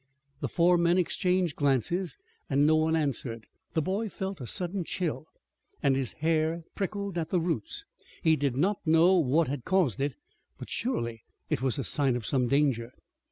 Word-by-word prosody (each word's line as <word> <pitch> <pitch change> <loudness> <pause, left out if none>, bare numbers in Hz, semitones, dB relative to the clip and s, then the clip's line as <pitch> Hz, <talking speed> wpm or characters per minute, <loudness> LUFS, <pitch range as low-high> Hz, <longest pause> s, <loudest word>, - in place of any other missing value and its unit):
The - - -2
four 175 0 +4
men 170 +1 +3
exchanged 180 -2 +1
glances, 145 - 0 0.3
and 140 +1 +3
no 155 +1 +5
one 160 +1 +2
answered. 125 -7 -2 0.3
The 160 - +2
boy 200 +5 -1
felt 190 -4 -5
a 125 - -5
sudden 180 - -1
chill, 165 -2 -3 0.6
and 140 -2 +4
his 135 -2 -2
hair 160 +1 0
prickled 200 -2 -3
at 160 - -3
the 180 - +2
roots. 315 - -3 0.4
He 160 -2 +5
did 140 -4 -1
not 190 +7 +2
know 170 +3 +5
what 155 +2 +2
had 135 -1 -3
caused 170 - +1
it, 140 +1 -1 0.4
but - - -9
surely 115 - -2 0.3
it - - +1
was 130 +1 0
a 135 - -1
sign 135 -2 +1
of 120 -3 -4
some 130 -3 +1
danger. 130 -3 +1
160 Hz, 175 wpm, -29 LUFS, 135-180 Hz, 0.6 s, no